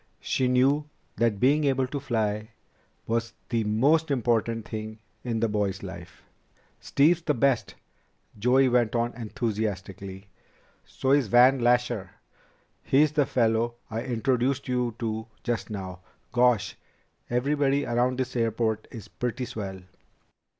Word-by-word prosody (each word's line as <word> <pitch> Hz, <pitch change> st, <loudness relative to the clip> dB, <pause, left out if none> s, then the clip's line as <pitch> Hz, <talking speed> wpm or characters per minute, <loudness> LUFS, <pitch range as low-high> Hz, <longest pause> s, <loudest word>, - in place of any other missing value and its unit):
She 130 Hz, -, 0 dB
knew 135 Hz, +4 st, +2 dB, 0.3 s
that 115 Hz, -4 st, +1 dB
being 145 Hz, +6 st, +3 dB
able 135 Hz, -1 st, +2 dB
to 140 Hz, +3 st, -4 dB
fly 110 Hz, -5 st, -1 dB, 0.6 s
was 115 Hz, 0 st, -1 dB, 0.2 s
the 115 Hz, -2 st, +1 dB
most 145 Hz, +10 st, +3 dB
important 115 Hz, -3 st, 0 dB
thing 110 Hz, 0 st, -6 dB, 0.3 s
in 115 Hz, -3 st, -2 dB
the 115 Hz, -, +3 dB
boy's 100 Hz, -2 st, -1 dB
life. 85 Hz, -3 st, -9 dB, 0.6 s
"Steve's 160 Hz, +5 st, +3 dB
the 150 Hz, -3 st, 0 dB
best," 130 Hz, 0 st, +1 dB, 0.6 s
Joey 130 Hz, +4 st, +4 dB
went 120 Hz, -2 st, +2 dB
on 120 Hz, +1 st, 0 dB
enthusiastically. 105 Hz, -5 st, -4 dB, 0.6 s
"So's 135 Hz, -1 st, +1 dB
Van 125 Hz, +5 st, +6 dB
Lasher 120 Hz, -5 st, +1 dB, 0.7 s
he's 145 Hz, +2 st, +3 dB
the 150 Hz, -2 st, +2 dB
fellow 115 Hz, -1 st, +1 dB, 0.2 s
I 110 Hz, +1 st, -2 dB
introduced 125 Hz, +2 st, 0 dB
you 125 Hz, -2 st, -1 dB
to 110 Hz, -1 st, -3 dB, 0.2 s
just 120 Hz, -2 st, -2 dB
now. 95 Hz, -3 st, -6 dB, 0.3 s
Gosh! 120 Hz, -5 st, +2 dB, 0.5 s
Everybody 140 Hz, +3 st, +1 dB
around 125 Hz, +2 st, +1 dB
this 130 Hz, -1 st, -3 dB
airport 110 Hz, -2 st, 0 dB
is 110 Hz, -5 st, -9 dB
pretty 125 Hz, +2 st, -3 dB
swell." 95 Hz, -5 st, -6 dB
120 Hz, 125 wpm, -27 LUFS, 110-130 Hz, 0.7 s, Van